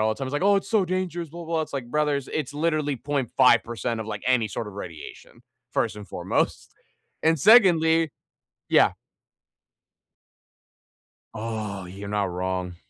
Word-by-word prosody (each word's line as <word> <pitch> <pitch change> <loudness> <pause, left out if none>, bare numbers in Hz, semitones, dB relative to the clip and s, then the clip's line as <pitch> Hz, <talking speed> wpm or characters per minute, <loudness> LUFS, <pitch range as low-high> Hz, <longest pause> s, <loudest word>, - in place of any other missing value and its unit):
all 110 - +2
the - - -17
time, 135 - -3
it's - - -7
like, 145 - -1
"Oh, 200 0 +5
it's 195 - -2
so 215 -4 +3
dangerous. 175 -2 -3
Blah 170 +2 -9
blah 165 +1 -4
blah." - - +2
It's - - -8
like, 135 -4 -4
"Brothers, 150 -3 0
it's 145 -2 -3
literally 155 -2 0
.5% 120 -3 +1
of, 110 - -5
like, 105 -2 -5
any 125 -4 +3
sort 110 - -4
of 100 - -11
radiation, 85 -6 -10 0.3
first 105 - 0
and 105 - -9
foremost. - - -2 0.5
And 160 0 +3
secondly" 165 - +5 0.6
Yeah. - - +5 2.4
Oh, 110 -4 -4
you're 100 +2 -8
not 100 -2 0
wrong. 90 0 -3
135 Hz, 160 wpm, -25 LUFS, 105-160 Hz, 2.4 s, Oh